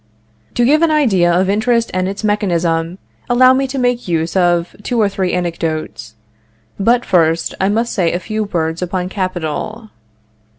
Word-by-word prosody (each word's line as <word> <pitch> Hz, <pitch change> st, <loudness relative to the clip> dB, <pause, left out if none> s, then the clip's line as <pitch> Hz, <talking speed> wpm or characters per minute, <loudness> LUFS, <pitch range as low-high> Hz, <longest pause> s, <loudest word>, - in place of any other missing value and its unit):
To 240 Hz, -, +2 dB
give 300 Hz, +5 st, +4 dB
an 335 Hz, -, +4 dB
idea 215 Hz, -, +3 dB
of 180 Hz, +2 st, +2 dB
interest 230 Hz, +3 st, +1 dB
and 185 Hz, 0 st, 0 dB
its 200 Hz, +2 st, -6 dB
mechanism, 175 Hz, -5 st, 0 dB, 0.3 s
allow 255 Hz, +1 st, +6 dB
me 270 Hz, +1 st, 0 dB
to 270 Hz, +1 st, -5 dB
make 245 Hz, -3 st, 0 dB
use 165 Hz, 0 st, -1 dB
of 175 Hz, -2 st, +1 dB
two 235 Hz, +3 st, -2 dB
or 210 Hz, -, +4 dB
three 190 Hz, -2 st, -2 dB
anecdotes. 160 Hz, -10 st, -3 dB, 0.6 s
But, 235 Hz, +4 st, +2 dB
first, 165 Hz, -3 st, +1 dB
I 190 Hz, -, +2 dB
must 230 Hz, +3 st, 0 dB
say 175 Hz, -4 st, +1 dB
a 175 Hz, -, -2 dB
few 215 Hz, +2 st, -3 dB
words 165 Hz, -3 st, -2 dB
upon 180 Hz, 0 st, -2 dB
capital. 185 Hz, +4 st, -4 dB
190 Hz, 165 wpm, -16 LUFS, 170-230 Hz, 0.6 s, allow